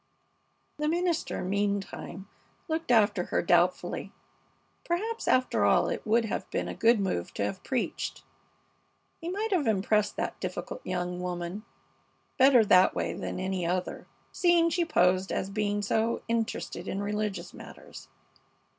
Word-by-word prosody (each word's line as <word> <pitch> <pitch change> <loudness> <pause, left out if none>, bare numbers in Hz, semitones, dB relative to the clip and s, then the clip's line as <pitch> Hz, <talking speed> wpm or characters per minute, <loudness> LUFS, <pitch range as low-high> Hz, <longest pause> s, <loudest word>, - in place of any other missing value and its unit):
The 300 - 0
minister, 340 +1 0
meantime, 200 0 -2 0.4
looked 325 +1 -2
after 220 -4 +3
her - - 0
doubtfully. - - +1 0.7
Perhaps, 440 +7 -2
after 255 0 +2
all, - - +4
it - - -4
would 230 +2 +3
have 220 - -4
been - - -2
a - - -4
good 230 0 +4
move 185 - -2
to 100 - 0
have 185 - -5
preached. 260 -3 -3 1.0
He 335 - -5
might 420 +4 -2
have 340 -9 +1
impressed 210 0 +1
that - - -3
difficult - - -5
young 180 -1 -3
woman 180 +3 -4 0.7
better 255 -4 +7
that 185 -2 +5
way - - -1
than - - -5
any 185 -1 -2
other, 180 +2 -2 0.2
seeing 345 -2 +3
she 345 +1 +1
posed 185 - +2
as 195 - -2
being 205 0 -1
so 225 +3 0
interested 225 -6 -2
in 200 +1 -2
religious 210 -1 -3
matters. - - -12
210 Hz, 140 wpm, -28 LUFS, 190-280 Hz, 1.0 s, better